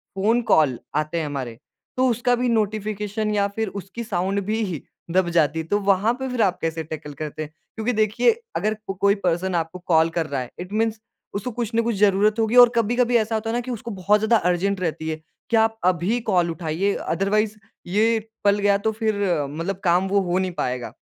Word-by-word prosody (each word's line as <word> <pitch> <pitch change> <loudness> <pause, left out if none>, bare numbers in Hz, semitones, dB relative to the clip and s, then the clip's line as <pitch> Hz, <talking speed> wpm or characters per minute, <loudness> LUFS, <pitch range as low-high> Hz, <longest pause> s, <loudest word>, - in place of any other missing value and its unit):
Phone 220 +5 +2
call 140 -6 +4 0.2
आते 155 +2 -1
हैं 160 - -2
हमारे 130 -6 -5 0.4
तो 260 0 +3
उसका 245 +1 +2
भी 245 0 0
नोटिफ़िकेशन 215 -1 -1
या 200 -1 +2
फिर 220 -1 -1
उसकी 200 +6 -8
साउंड 195 0 -1
भी 220 +2 -1 0.5
दब 185 -1 +2
जाती 160 -2 +2
है, 160 - -4
तो 205 +5 +1
वहाँ 200 +3 +2
पे 265 - -3
फिर 250 -2 -1
आप 185 -4 +2
कैसे 160 0 -2
टैकल 155 -1 -7
करते 155 +2 -5
हैं? 150 - -9 0.2
क्योंकि 225 +3 -1
देखिए 215 - +3 0.2
अगर 215 +1 0
को 195 - -2
कोई 200 +2 +2
पर्सन 180 +1 0
आपको 165 +2 -2
कॉल 160 -1 +4
कर 165 - +1
रहा 140 -2 -2
है 125 - -8
इट 180 +2 -7
मीन्स 220 0 0 0.4
उसको 205 +5 -3
कुछ 235 -1 -4
ना 230 - +4
कुछ 230 -2 -1
जरूरत 210 +2 +3
होगी 225 +2 +1
और 240 - +5
कभी-कभी 240 +2 +2
ऐसा 220 0 0
होता 220 +1 -2
है 230 - -1
ना - - +1
कि 250 +1 -6
उसको 235 0 -5
बहुत 200 +1 +2
ज़्यादा 220 +2 +3
अर्जेंट 190 +2 0
रहती 160 -2 -2
है 155 0 -4 0.3
कि 230 - +2
आप 225 0 +2
अभी 185 +6 +2
कॉल 175 -2 +2
उठाइए 170 +4 -1
अदरवाइज़ 215 +2 0 0.3
ये 220 +4 +3 0.2
पल 200 0 +3
गया 200 0 +3
तो - - +3
फिर 215 -2 -1 0.3
मतलब 170 +6 -4
काम 180 +2 +3
वो 200 +1 +2
हो 180 - +2
नहीं 185 -1 -1
पाएगा। 125 -1 -3
200 Hz, 215 wpm, -23 LUFS, 170-220 Hz, 0.5 s, और